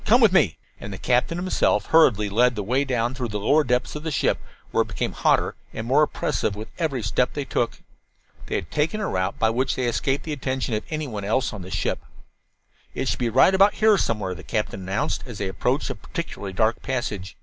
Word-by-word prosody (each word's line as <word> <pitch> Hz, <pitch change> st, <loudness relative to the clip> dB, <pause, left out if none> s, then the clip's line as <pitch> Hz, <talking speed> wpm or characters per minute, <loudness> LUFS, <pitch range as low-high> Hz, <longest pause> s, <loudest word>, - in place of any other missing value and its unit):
Come 240 Hz, +3 st, +5 dB
with 225 Hz, -6 st, +6 dB
me." 145 Hz, -, +3 dB, 0.2 s
And 100 Hz, -, -7 dB
the 95 Hz, -, -6 dB
captain 125 Hz, -, +1 dB
himself 185 Hz, +1 st, +1 dB
hurriedly 115 Hz, -11 st, +4 dB
led 120 Hz, +5 st, +3 dB
the 105 Hz, -, -3 dB
way 130 Hz, +7 st, +1 dB
down 125 Hz, -2 st, 0 dB
through 130 Hz, -2 st, -3 dB
the 105 Hz, -2 st, -3 dB
lower 145 Hz, +9 st, +3 dB
depths 125 Hz, +1 st, 0 dB
of 150 Hz, -, -4 dB
the 160 Hz, -, -3 dB
ship, 150 Hz, -, +1 dB, 0.3 s
where -, -, +3 dB
it -, -, -1 dB
became -, -, -2 dB
hotter -, -, +2 dB, 0.2 s
and 110 Hz, -, -4 dB
more 135 Hz, +5 st, +4 dB
oppressive 110 Hz, -8 st, 0 dB
with 110 Hz, +1 st, -7 dB
every 140 Hz, -8 st, -1 dB
step 110 Hz, +5 st, +1 dB
they 145 Hz, -, -3 dB
took. 120 Hz, -2 st, -2 dB, 0.6 s
They -, -, -2 dB
had 85 Hz, -, -3 dB
taken 155 Hz, +8 st, 0 dB
a 210 Hz, -, -1 dB
route 95 Hz, 0 st, -1 dB
by 110 Hz, 0 st, +2 dB
which 130 Hz, +3 st, 0 dB
they 130 Hz, -, -1 dB
escaped 135 Hz, +4 st, 0 dB
the 155 Hz, -, -4 dB
attention 130 Hz, -3 st, -2 dB
of 105 Hz, -, 0 dB
anyone 140 Hz, -10 st, -4 dB
else 115 Hz, +5 st, 0 dB
on 105 Hz, -, -7 dB
the 90 Hz, -, -8 dB
ship. -, -, -1 dB, 1.0 s
"It -, -, -1 dB
should -, -, -1 dB
be 120 Hz, -, +1 dB
right 130 Hz, -, +5 dB
about 195 Hz, +2 st, +5 dB
here 215 Hz, -1 st, +5 dB
somewhere," 105 Hz, -, -1 dB
the 90 Hz, -, -9 dB
captain 105 Hz, -3 st, -3 dB
announced, 100 Hz, +11 st, -1 dB
as 120 Hz, -4 st, -7 dB
they 100 Hz, -, -2 dB
approached 125 Hz, +9 st, -1 dB
a -, -, -2 dB
particularly 155 Hz, -, -6 dB
dark 110 Hz, +3 st, +1 dB
passage. 105 Hz, -8 st, -3 dB
125 Hz, 225 wpm, -24 LUFS, 105-150 Hz, 1.0 s, with